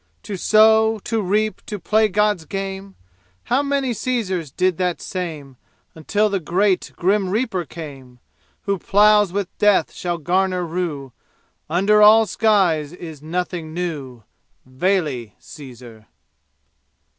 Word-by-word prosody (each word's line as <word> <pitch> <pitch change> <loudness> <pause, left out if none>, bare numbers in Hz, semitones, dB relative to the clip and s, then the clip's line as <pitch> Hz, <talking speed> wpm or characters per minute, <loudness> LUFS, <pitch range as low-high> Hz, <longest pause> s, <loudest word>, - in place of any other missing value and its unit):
To 200 - -5
sow 220 +3 +4
to 225 -2 -1
reap 210 +3 -1
to 210 - -4
play 215 +4 +2
God's 210 -4 0
game? 195 0 -6 0.5
How 255 +3 +1
many 280 -3 -1
Caesars 195 - -2
did 180 +5 0
that 180 -2 -1
same 155 -8 -6 0.4
Until 205 +7 0
the 200 -2 -1
great, 185 +3 0
grim 190 +1 +1
Reaper 205 -4 -1
came! 135 -4 -10 0.5
Who 200 -2 -1
ploughs 210 0 +4
with 200 -1 -4
death 205 -5 +3
shall 175 -1 -3
garner 180 +3 0
rue, 160 -7 -4 0.6
And 165 - -1
under 210 +1 +4
all 220 +1 +7
skies 185 -10 +1
is 160 -5 -10
nothing 165 0 -4
new. 145 -9 -5 0.4
Vale, 130 - -1
Caesar! 120 -6 -13
185 Hz, 125 wpm, -20 LUFS, 160-210 Hz, 0.6 s, all